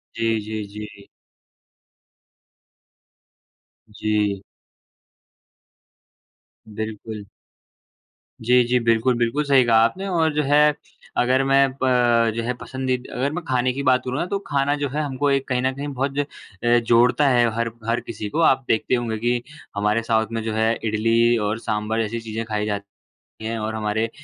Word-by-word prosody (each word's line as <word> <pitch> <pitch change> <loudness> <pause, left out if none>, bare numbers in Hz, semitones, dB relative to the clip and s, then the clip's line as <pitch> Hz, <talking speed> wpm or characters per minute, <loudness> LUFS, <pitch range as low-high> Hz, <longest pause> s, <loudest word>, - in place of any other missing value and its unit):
जी, 115 -1 0
जी, 110 0 -5
जी। 105 -1 -9 2.8
जी। 105 -2 -1 2.4
बिल्कुल। 110 -1 -6 1.2
जी, 125 0 +5
जी। 125 +1 +1
बिल्कुल, 115 +2 +2
बिल्कुल 120 +6 0
सही 135 -3 +4
कहा 115 -1 +4
आपने 190 +12 -1
और 165 -4 +1
जो 150 0 +1
है, 150 +1 +4 0.4
अगर 130 +2 +3
मैं 135 0 +4
प 120 -3 +3
जो 115 - -2
है, 125 - -1
पसंदीदा 130 0 -4
अगर 135 +4 0
मैं 175 0 -4
खाने 125 0 +1
की 140 +1 -4
बात 130 -1 +3
करूँ 130 +2 -2
ना - - 0
तो - - +2
खाना 140 +1 +1
जो 145 -2 -2
है 150 +3 -2
हमको 145 0 -1
एक 135 -1 0
कहीं 125 -2 0
न 130 +1 +1
कहीं 145 +1 -5
बहुत 135 +2 -2
अ, 145 - +1 0.6
जोड़ता 120 +5 +4
है 120 -2 +4
हर 115 0 -1 0.2
हर 115 +1 +1
किसी 105 -2 -6
को। 160 - -2
आप 135 0 +1
देखते 110 +3 +1
होंगे 115 -2 -2
कि 120 +2 0 0.3
हमारे 105 +2 +1
साउथ 110 -1 +1
में 115 -1 -2
जो 110 - -3
है 110 +1 +2
इडली 115 +2 +2
और 110 +2 -2
सांभर 110 +1 -1
जैसी 115 +2 -3
चीज़ें 115 0 -5
खाई 105 -1 -2
जाती 100 -1 -6 0.4
हैं 115 0 -2
और 110 +1 -3
हमारे 110 +1 -1
120 Hz, 160 wpm, -22 LUFS, 110-130 Hz, 2.8 s, जी